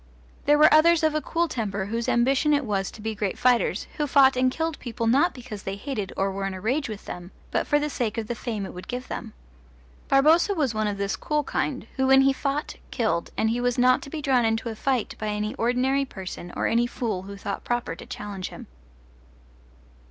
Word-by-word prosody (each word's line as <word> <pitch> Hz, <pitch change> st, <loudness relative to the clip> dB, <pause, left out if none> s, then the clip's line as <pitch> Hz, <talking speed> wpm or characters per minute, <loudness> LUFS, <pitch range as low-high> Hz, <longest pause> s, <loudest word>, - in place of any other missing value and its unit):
There 295 Hz, +1 st, +5 dB
were 300 Hz, 0 st, +7 dB
others 325 Hz, +1 st, +5 dB
of 315 Hz, -1 st, +3 dB
a 305 Hz, -, 0 dB
cool 340 Hz, +2 st, 0 dB
temper 200 Hz, -8 st, -3 dB
whose 230 Hz, +3 st, -2 dB
ambition 270 Hz, +5 st, +3 dB
it 285 Hz, -2 st, 0 dB
was 195 Hz, -3 st, -1 dB
to 215 Hz, -, -12 dB
be 220 Hz, 0 st, -2 dB
great 205 Hz, -3 st, -2 dB
fighters, 245 Hz, -5 st, +2 dB
who 295 Hz, -, 0 dB
fought 270 Hz, -1 st, +5 dB
and 255 Hz, 0 st, +3 dB
killed 320 Hz, +2 st, -2 dB
people 230 Hz, -2 st, -4 dB
not 275 Hz, +10 st, +4 dB
because 240 Hz, -5 st, -8 dB
they 195 Hz, +1 st, -4 dB
hated 210 Hz, -3 st, -4 dB
or 195 Hz, 0 st, +1 dB
were 195 Hz, 0 st, -3 dB
in 195 Hz, -, -4 dB
a -, -, -6 dB
rage 255 Hz, +7 st, -1 dB
with 210 Hz, -2 st, -7 dB
them, 175 Hz, 0 st, -7 dB, 0.2 s
but -, -, 0 dB
for 295 Hz, -, +3 dB
the 295 Hz, 0 st, 0 dB
sake 240 Hz, -7 st, -2 dB
of 225 Hz, -, -2 dB
the 240 Hz, -, -3 dB
fame 220 Hz, -3 st, -4 dB
it -, -, -8 dB
would 180 Hz, -, -9 dB
give 250 Hz, +1 st, -5 dB
them. 225 Hz, -3 st, -6 dB, 0.7 s
Barboza 320 Hz, +8 st, +4 dB
was 285 Hz, -8 st, 0 dB
one 215 Hz, 0 st, 0 dB
of 205 Hz, -1 st, -2 dB
this 200 Hz, 0 st, -1 dB
cool 300 Hz, -1 st, -1 dB
kind, 270 Hz, -2 st, -2 dB
who 265 Hz, 0 st, +2 dB
when 270 Hz, 0 st, +7 dB
he 270 Hz, 0 st, +4 dB
fought 280 Hz, +2 st, -3 dB
killed, 220 Hz, -8 st, -1 dB
and 220 Hz, -, +2 dB
he 240 Hz, +1 st, -1 dB
was 245 Hz, -1 st, 0 dB
not 255 Hz, +1 st, +4 dB
to -, -, -9 dB
be 305 Hz, 0 st, -5 dB
drawn 260 Hz, -3 st, +3 dB
into 225 Hz, +1 st, 0 dB
a 225 Hz, -, -5 dB
fight 255 Hz, 0 st, -1 dB
by 215 Hz, -, -3 dB
any 210 Hz, 0 st, -2 dB
ordinary 255 Hz, +4 st, +1 dB
person 185 Hz, -6 st, -8 dB
or -, -, -1 dB
any 235 Hz, +1 st, +2 dB
fool 220 Hz, -6 st, -3 dB
who 200 Hz, +1 st, -9 dB
thought 200 Hz, 0 st, -5 dB
proper 240 Hz, -8 st, -2 dB
to -, -, -11 dB
challenge 200 Hz, -3 st, -6 dB
him. -, -, -10 dB
240 Hz, 230 wpm, -25 LUFS, 210-275 Hz, 0.7 s, were